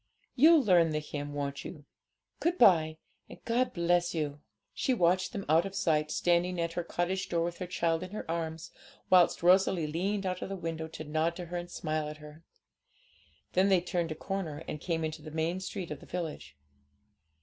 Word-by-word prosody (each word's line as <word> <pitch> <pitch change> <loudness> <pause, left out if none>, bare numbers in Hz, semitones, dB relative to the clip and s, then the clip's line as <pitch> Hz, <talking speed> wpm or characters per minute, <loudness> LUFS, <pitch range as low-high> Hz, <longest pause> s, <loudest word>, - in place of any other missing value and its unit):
You'll 310 +2 +7
learn 175 -6 +5
the 150 - 0
hymn, 145 -1 -6
won't 140 -1 -3
you? 150 -4 -9 0.5
Good 345 +2 0
bye, 160 - +5 0.3
and - - -10
God 245 +2 +1
bless 175 0 +1
you!' 145 -2 -3 0.3
She 260 - 0
watched 185 -1 +2
them 195 - -5
out 160 +2 +4
of 195 0 -6
sight, 155 -5 +1
standing 175 +2 +1
at 170 0 -1
her 175 - -2
cottage 175 +2 -2
door 170 -1 +1
with 170 0 -4
her 180 - -4
child 170 -2 0
in 185 - -6
her 210 - -6
arms, 165 0 -4 0.4
whilst 180 -2 +5
Rosalie 180 -2 +4
leaned 190 +6 -1
out 185 -1 -2
of - - -4
the 195 - -3
window 165 -3 -4
to 160 0 -8
nod 160 +2 0
to 180 - -6
her 175 +1 -5
and 175 0 -6
smile 155 -3 -2
at 150 - -8
her. 150 +1 -13 1.1
Then 190 +2 +4
they 190 -2 +5
turned 175 -1 -2
a - - -3
corner, 165 -4 -4
and 150 - -5
came 165 -2 -1
into 155 0 -4
the 155 - -9
main 160 +3 -1
street 185 -2 -5
of 150 - -5
the - - -15
village. 150 - -5
170 Hz, 200 wpm, -30 LUFS, 155-185 Hz, 1.1 s, You'll